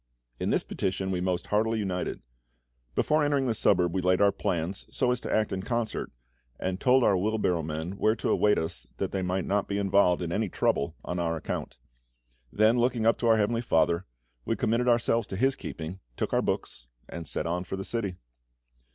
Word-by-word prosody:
In -, -, -1 dB
this -, -, +2 dB
petition 95 Hz, 0 st, -2 dB
we 90 Hz, -1 st, -1 dB
most 90 Hz, -1 st, -1 dB
heartily 110 Hz, +2 st, +2 dB
united. 95 Hz, -4 st, -3 dB, 0.7 s
Before 155 Hz, 0 st, +2 dB
entering 145 Hz, -2 st, +2 dB
the 120 Hz, -, +1 dB
suburb 90 Hz, -5 st, +2 dB
we 95 Hz, -, 0 dB
laid 90 Hz, 0 st, +3 dB
our 100 Hz, 0 st, +5 dB
plans, 90 Hz, +2 st, -2 dB
so 125 Hz, -, +1 dB
as 125 Hz, -, 0 dB
to -, -, -5 dB
act 110 Hz, -2 st, +1 dB
in 95 Hz, -, -2 dB
concert, 115 Hz, +2 st, -2 dB, 0.5 s
and 95 Hz, +1 st, -3 dB
told 130 Hz, -1 st, +5 dB
our 100 Hz, -, +4 dB
wheel 105 Hz, +4 st, 0 dB
barrow 90 Hz, -5 st, +1 dB
men 80 Hz, +2 st, -4 dB
where 110 Hz, +1 st, +3 dB
to -, -, -1 dB
await 105 Hz, 0 st, +3 dB
us, 80 Hz, -, -4 dB
that -, -, -2 dB
they 95 Hz, -, -1 dB
might 90 Hz, 0 st, -1 dB
not 100 Hz, 0 st, 0 dB
be 100 Hz, -, -2 dB
involved 100 Hz, -3 st, +3 dB
in 85 Hz, -, -3 dB
any 105 Hz, +2 st, 0 dB
trouble 70 Hz, -2 st, 0 dB
on 90 Hz, -, -3 dB
our 85 Hz, -1 st, 0 dB
account. 80 Hz, -, -5 dB, 0.7 s
Then 110 Hz, +3 st, +4 dB
looking 120 Hz, -2 st, +1 dB
up 115 Hz, -, +3 dB
to 120 Hz, -, 0 dB
our 115 Hz, -1 st, +5 dB
Heavenly 115 Hz, +2 st, +1 dB
FATHER, 85 Hz, -4 st, +1 dB, 0.4 s
we -, -, -1 dB
committed 115 Hz, +3 st, +1 dB
ourselves 115 Hz, -2 st, +2 dB
to -, -, -5 dB
His 130 Hz, +7 st, +2 dB
keeping, 85 Hz, +4 st, -7 dB, 0.2 s
took -, -, -2 dB
our -, -, +3 dB
books, -, -, -3 dB, 0.2 s
and 85 Hz, -1 st, -7 dB
set -, -, -2 dB
on 90 Hz, +2 st, -1 dB
for 95 Hz, -, -5 dB
the 95 Hz, 0 st, -5 dB
city. 105 Hz, -6 st, -2 dB
100 Hz, 205 wpm, -28 LUFS, 90-115 Hz, 0.7 s, our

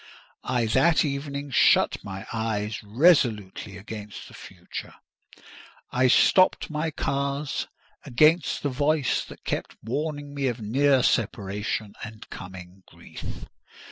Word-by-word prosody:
I 120 Hz, -2 st, 0 dB
that 160 Hz, +10 st, +3 dB
evening 140 Hz, 0 st, -4 dB
shut -, -, +4 dB
my 95 Hz, -1 st, -7 dB
eyes 110 Hz, -2 st, -2 dB
resolutely 110 Hz, -, +2 dB
against 105 Hz, +1 st, -8 dB
the -, -, -15 dB
future: -, -, -9 dB, 1.0 s
I 130 Hz, +1 st, +3 dB
stopped 185 Hz, +7 st, +4 dB
my 155 Hz, +1 st, -1 dB
ears 140 Hz, +1 st, -1 dB, 0.4 s
against 155 Hz, +7 st, +3 dB
the 145 Hz, -, +1 dB
voice 145 Hz, +1 st, +1 dB
that -, -, -13 dB
kept -, -, -3 dB
warning 145 Hz, +4 st, -3 dB
me 140 Hz, -1 st, -1 dB
of 120 Hz, -1 st, -2 dB
near 130 Hz, +4 st, +3 dB
separation 105 Hz, -2 st, -1 dB
and 110 Hz, -1 st, -9 dB
coming 90 Hz, 0 st, -10 dB
grief. -, -, -9 dB
125 Hz, 115 wpm, -26 LUFS, 105-145 Hz, 1.0 s, shut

